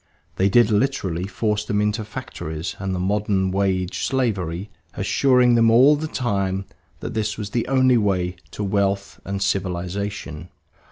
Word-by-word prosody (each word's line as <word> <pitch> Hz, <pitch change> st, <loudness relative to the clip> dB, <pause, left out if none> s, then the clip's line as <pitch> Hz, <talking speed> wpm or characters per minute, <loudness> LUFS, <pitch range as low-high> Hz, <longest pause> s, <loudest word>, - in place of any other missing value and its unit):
They 95 Hz, +1 st, +3 dB
did 120 Hz, +1 st, +4 dB
literally 100 Hz, -7 st, 0 dB
force 105 Hz, +1 st, -1 dB
them 105 Hz, -1 st, -1 dB
into 105 Hz, +1 st, 0 dB
factories 85 Hz, -8 st, -6 dB
and 95 Hz, -1 st, -2 dB
the -, -, -2 dB
modern 95 Hz, 0 st, 0 dB
wage 95 Hz, -2 st, 0 dB
slavery, 100 Hz, -8 st, -1 dB, 0.2 s
assuring 125 Hz, +4 st, +3 dB
them 115 Hz, -1 st, +5 dB
all 130 Hz, +6 st, +6 dB
the 155 Hz, +2 st, -3 dB
time 100 Hz, -8 st, -1 dB, 0.4 s
that -, -, -5 dB
this 110 Hz, -1 st, -2 dB
was 105 Hz, -2 st, -5 dB
the 120 Hz, 0 st, -1 dB
only 130 Hz, -2 st, +4 dB
way 90 Hz, -4 st, 0 dB, 0.2 s
to 105 Hz, -, -4 dB
wealth 100 Hz, 0 st, -1 dB
and 100 Hz, 0 st, -2 dB
civilization. 95 Hz, -2 st, -3 dB
100 Hz, 150 wpm, -22 LUFS, 95-115 Hz, 0.4 s, all